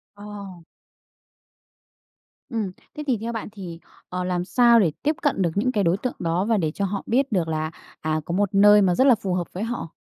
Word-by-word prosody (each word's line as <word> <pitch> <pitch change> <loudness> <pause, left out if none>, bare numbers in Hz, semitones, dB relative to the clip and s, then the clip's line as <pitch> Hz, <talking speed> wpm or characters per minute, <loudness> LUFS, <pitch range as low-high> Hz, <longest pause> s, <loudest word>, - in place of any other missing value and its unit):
Ờ. 205 0 -12 2.2
Ừm. 215 -5 -3 0.2
Thế 300 - -5
thì 250 -5 +1
theo 230 +1 -3
bạn 225 - -5
thì, 175 -5 -8 0.3
ờ, 180 0 -3
làm 180 -1 -1
sao 235 +4 +5
để 170 -7 +2
tiếp 305 +2 +1
cận 280 -10 +1
được 170 - +1
những 255 +6 +1
cái 205 -4 +1
đối 170 +2 +3
tượng 250 +4 -4
đó 170 +2 0
và 225 0 +2
để 165 -6 0
cho 200 - -1
họ 195 +1 -2
biết 265 +2 +1
được 175 -5 +1
là, 155 0 -2 0.3
à, 155 0 -1
có 170 - -4
một 200 +1 0
nơi 205 +1 +7
mà 180 -2 +3
rất 260 - +3
là 260 - +7
phù 200 -4 -3
hợp 175 -2 -1
với 185 - -5
họ? 230 -7 -4
200 Hz, 220 wpm, -23 LUFS, 175-230 Hz, 2.2 s, nơi